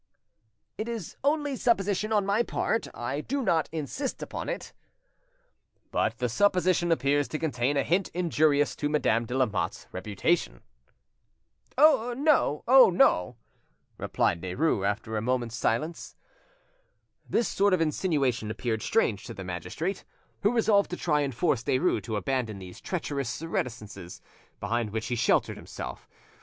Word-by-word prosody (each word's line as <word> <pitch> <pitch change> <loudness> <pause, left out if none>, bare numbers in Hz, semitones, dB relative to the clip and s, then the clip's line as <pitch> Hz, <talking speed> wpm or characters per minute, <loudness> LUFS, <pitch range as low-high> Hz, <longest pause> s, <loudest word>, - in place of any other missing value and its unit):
"It 220 +2 -3
is 225 -7 -5
only 290 -1 +1
supposition 210 -3 +1
on 205 -2 +2
my 200 +3 +2
part, 230 -1 -1
I 120 +5 -3
do 275 - -2
not 165 -8 +1
insist 165 - -4
upon - - -5
it." - - -5 1.2
"But - - 0
the 125 - 0
supposition 180 - +2
appears 145 -2 +2
to 155 - -3
contain 145 -3 0
a 140 - +2
hint 180 +3 +1
injurious 155 -4 +2
to 145 - -1
Madame 115 -6 +1
de 125 - -2
Lamotte's 105 -5 -1
reputation?" 100 - -1 1.1
"No, 265 - +3
oh 260 -2 +8
no!" 120 - +3 0.6
replied 85 - 0
Derues, 95 - 0
after 110 +2 -3
a - - -1
moment's 120 -1 -1
silence. 150 +8 -2 1.1
This 235 - +1
sort 200 +1 +2
of 185 - +3
insinuation 145 - 0
appeared 110 0 -2
strange 115 - +1
to - - -8
the 95 - -7
magistrate, 95 - -4 0.4
who 205 - +3
resolved 215 -4 +3
to 180 - -4
try 150 -3 +1
and 140 -4 -2
force 130 -3 +1
Derues 130 - +1
to 110 - -3
abandon 115 -1 -1
these 90 -2 -10
treacherous 140 -8 -3
reticences 105 - -5 0.4
behind 115 -1 -1
which 110 +1 -3
he 120 - 0
sheltered 115 - +1
himself. - - -8
145 Hz, 140 wpm, -28 LUFS, -, 1.2 s, oh